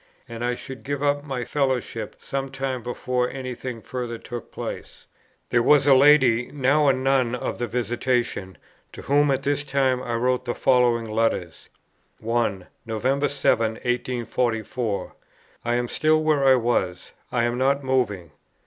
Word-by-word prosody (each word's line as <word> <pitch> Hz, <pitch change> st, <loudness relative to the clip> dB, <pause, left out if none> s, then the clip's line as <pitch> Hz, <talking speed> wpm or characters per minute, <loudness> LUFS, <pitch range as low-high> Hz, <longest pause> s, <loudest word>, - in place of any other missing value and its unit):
And 115 Hz, 0 st, -6 dB
I 120 Hz, 0 st, 0 dB
should 135 Hz, +1 st, -9 dB
give 145 Hz, 0 st, -3 dB
up 145 Hz, 0 st, +1 dB
my 130 Hz, -4 st, -4 dB
fellowship 130 Hz, -6 st, -2 dB
some 135 Hz, 0 st, -4 dB
time 135 Hz, -1 st, -3 dB
before 125 Hz, +1 st, -1 dB
any 130 Hz, -2 st, -5 dB
thing 120 Hz, -2 st, -7 dB
further 120 Hz, -2 st, -4 dB
took 120 Hz, 0 st, -8 dB
place." -, -, -7 dB, 0.5 s
There 120 Hz, -, +4 dB
was 145 Hz, +3 st, +5 dB
a 140 Hz, -, +7 dB
lady, 130 Hz, -4 st, +5 dB
now 145 Hz, +1 st, +2 dB
a 135 Hz, -, +5 dB
nun 130 Hz, -2 st, +1 dB
of 125 Hz, -, -4 dB
the 120 Hz, -, -1 dB
Visitation, 120 Hz, -4 st, -1 dB, 0.4 s
to -, -, -9 dB
whom 145 Hz, +1 st, +3 dB
at 135 Hz, -, 0 dB
this 145 Hz, 0 st, 0 dB
time 135 Hz, -2 st, +1 dB
I 120 Hz, -2 st, -3 dB
wrote 125 Hz, +1 st, 0 dB
the 120 Hz, -, -2 dB
following 120 Hz, -3 st, +3 dB
letters: 110 Hz, -8 st, -1 dB, 0.5 s
1. 110 Hz, -5 st, -1 dB, 0.2 s
"November 130 Hz, +5 st, 0 dB
7, 115 Hz, -5 st, +1 dB
1844. 120 Hz, -2 st, -2 dB, 0.5 s
I 120 Hz, 0 st, 0 dB
am 120 Hz, 0 st, 0 dB
still 155 Hz, +4 st, +2 dB
where 150 Hz, -3 st, +2 dB
I 135 Hz, -1 st, +7 dB
was; 115 Hz, -7 st, -1 dB, 0.2 s
I 120 Hz, -1 st, +1 dB
am 120 Hz, +1 st, 0 dB
not 140 Hz, +2 st, +2 dB
moving. 110 Hz, -, -1 dB
125 Hz, 160 wpm, -24 LUFS, 115-135 Hz, 0.5 s, a